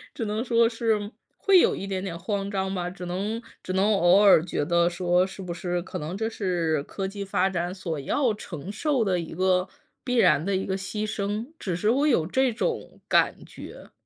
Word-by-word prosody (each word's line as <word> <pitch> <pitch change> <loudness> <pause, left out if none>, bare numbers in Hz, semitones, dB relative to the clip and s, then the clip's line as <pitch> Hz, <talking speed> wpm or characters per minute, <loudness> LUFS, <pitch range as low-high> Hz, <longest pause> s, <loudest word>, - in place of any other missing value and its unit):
只 - - -3
能 215 +2 -2
说 235 -2 +3
是 220 -3 -1 0.3
会 390 -2 +5
有 - - +3
一 - - -5
点 190 -1 -3
点 175 -4 -4
慌 195 +3 -3
张 190 -1 -2
吧， 180 -2 -2
只 180 0 -8
能 200 +6 -2 0.2
只 185 - -5
能 200 +3 +3
偶 180 0 +5
尔 200 -6 +6
觉 165 -4 -2
得 170 +1 +3
说， 175 +1 +2
是 195 0 -9
不 175 -2 -4
是 175 +1 -2
可 - - -6
能 155 +5 -5
这 220 +1 -1
是 175 -8 -1
科 190 +6 -4
技 200 +1 -5
发 195 0 +1
展 175 0 -2
所 170 -5 -4
要 240 - +1
承 180 -4 -7
受 265 +3 0
的 185 -4 +1
一 165 -2 -6
个， 185 +1 +2 0.4
必 250 - -1
然 150 -11 +4
的 200 0 0
一 190 - -1
个 190 - -1
牺 200 +2 -4
牲， 210 +2 -3
只 185 - -3
是 210 +5 0
我 275 +6 +3
有 170 - +3
这 260 +6 +2
种 455 - -3
感 - - +2
觉。 - - -11
195 Hz, 230 characters per minute, -26 LUFS, 175-215 Hz, 0.4 s, 尔